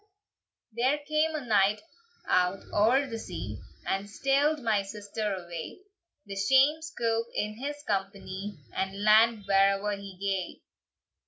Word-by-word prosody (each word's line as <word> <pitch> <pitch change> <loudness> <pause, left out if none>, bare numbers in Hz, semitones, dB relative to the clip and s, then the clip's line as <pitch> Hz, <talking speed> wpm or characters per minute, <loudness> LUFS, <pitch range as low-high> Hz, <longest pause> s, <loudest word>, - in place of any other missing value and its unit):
"There 250 +6 +2
came 310 +1 +1
a 290 -4 -4
knight 210 -1 +3 0.4
out 180 +1 +2
oer 240 +7 +4
the 230 -4 -5
sea, - - -6 0.3
And 195 +1 -2
steald 280 +7 +2
my 215 -3 +2
sister 205 +1 -4
away; 175 - -6 0.4
The 200 -1 -7
shame 270 +9 +4
scoup 230 -8 -1
in 215 +1 -2
his 290 +2 -5
company, 195 - -3 0.2
And 195 +1 -3
land 215 0 +5
where'er 195 +1 +3
he 200 -2 -10
gae!" 195 -2 -3
210 Hz, 130 wpm, -29 LUFS, 195-255 Hz, 0.4 s, land